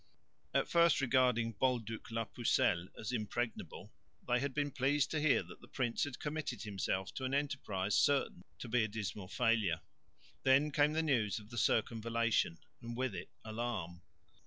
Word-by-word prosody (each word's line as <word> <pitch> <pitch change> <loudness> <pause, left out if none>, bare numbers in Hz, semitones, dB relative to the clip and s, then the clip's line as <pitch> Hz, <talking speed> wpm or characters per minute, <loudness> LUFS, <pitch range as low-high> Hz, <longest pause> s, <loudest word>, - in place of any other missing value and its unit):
At - - +1
first 170 -1 +4
regarding 125 -4 +2
Bolduc 115 -4 -1
la 115 0 -2
pucelle 95 -6 +1
as 110 - -4
impregnable, 110 -3 -4 0.3
they 125 0 +3
had 140 +2 -1
been 145 +1 -1
pleased 135 +2 +1
to 155 - 0
hear 150 -2 +4
that - - -13
the - - -14
prince 120 -3 0
had 145 -4 -6
committed 145 -7 -4
himself 95 -2 -2
to 130 - -5
an 130 +1 0
enterprise 105 -9 -1
certain 135 -8 +2
to - - -7
be 120 0 +2
a - - +1
dismal 105 -2 -5
failure. 110 -7 +1 0.6
Then 135 +3 +4
came 150 +1 +3
the 160 +1 +1
news 115 -10 +1
of 105 +1 -10
the 120 - -7
circumvallation, 115 -5 +1 0.2
and 120 0 -6
with 130 -3 -1
it - - -6 0.2
alarm. 110 -6 -4
120 Hz, 165 wpm, -35 LUFS, 110-135 Hz, 0.6 s, first